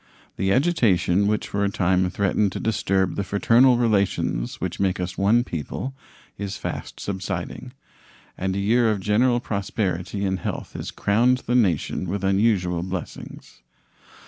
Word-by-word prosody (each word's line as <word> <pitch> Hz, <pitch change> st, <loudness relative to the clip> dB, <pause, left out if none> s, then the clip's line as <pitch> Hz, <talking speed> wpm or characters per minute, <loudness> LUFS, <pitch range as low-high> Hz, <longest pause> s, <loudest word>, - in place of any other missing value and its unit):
The 95 Hz, 0 st, 0 dB
agitation 100 Hz, -, +2 dB
which 105 Hz, 0 st, 0 dB
for 100 Hz, 0 st, -1 dB
a 100 Hz, -, +2 dB
time 90 Hz, -1 st, +1 dB
threatened 100 Hz, 0 st, 0 dB
to -, -, -4 dB
disturb 95 Hz, -4 st, 0 dB
the 100 Hz, -, -2 dB
fraternal 115 Hz, +6 st, +4 dB
relations 100 Hz, -, 0 dB
which -, -, -4 dB
make 95 Hz, -2 st, +1 dB
us 90 Hz, 0 st, -3 dB
one 110 Hz, +5 st, +3 dB
people 105 Hz, -, -5 dB, 0.5 s
is 100 Hz, -1 st, -4 dB
fast -, -, -6 dB
subsiding, 100 Hz, +6 st, -5 dB, 0.6 s
and 95 Hz, 0 st, -2 dB
a -, -, -1 dB
year 115 Hz, +4 st, +3 dB
of 105 Hz, -2 st, 0 dB
general 120 Hz, +5 st, +2 dB
prosperity 100 Hz, -3 st, -2 dB
and 95 Hz, -1 st, -1 dB
health -, -, -5 dB
has -, -, -5 dB
crowned 120 Hz, +5 st, +2 dB
the 120 Hz, -, -1 dB
nation 95 Hz, -6 st, +1 dB
with 100 Hz, +1 st, -3 dB
unusual 95 Hz, -3 st, +2 dB
blessings. 90 Hz, -1 st, -7 dB
100 Hz, 145 wpm, -23 LUFS, 95-115 Hz, 0.6 s, fraternal